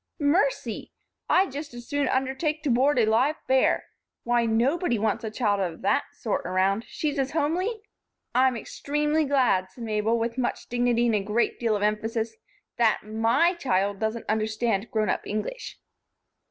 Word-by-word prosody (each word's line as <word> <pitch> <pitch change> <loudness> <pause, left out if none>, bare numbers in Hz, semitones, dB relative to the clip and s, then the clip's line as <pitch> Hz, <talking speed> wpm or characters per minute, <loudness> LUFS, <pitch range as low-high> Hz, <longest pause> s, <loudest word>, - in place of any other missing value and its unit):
"Mercy! 345 +12 0 0.4
I'd 375 -3 +3
just 285 -1 -7
as 240 0 -9
soon 285 -2 0
undertake 270 +4 -1
to 285 - +1
board 265 +4 +3
a 235 - +4
live 245 +8 +2
bear! 260 0 +3 0.4
Why! 240 -1 +2
Nobody 240 +5 +1
wants 215 +1 -1
a 220 - -2
child 215 -2 0
of 175 -4 -3
that 280 +8 +2
sort 220 - -2
around. 195 +4 +1
She's 295 -2 -2
as 270 0 -1
homely 365 +9 -1 0.2
" - - -55
"I'm 255 0 +3
extremely 295 +5 -1
glad," 250 -10 +2
said 235 +5 -10
Mabel, 220 +1 0
with 230 +2 -2
much 245 - -2
dignity 240 0 +2
and 235 - +2
a 210 - +3
great 210 +4 0
deal 230 -3 +1
of 205 - -2
emphasis, 220 +2 -1 0.4
"that 230 -3 +3
my 225 - +2
child 200 - 0
doesn't 220 +2 -2
understand 215 0 0
grown 215 -1 0
up - - -3
English." 215 - -4
235 Hz, 165 wpm, -26 LUFS, 215-285 Hz, 0.4 s, a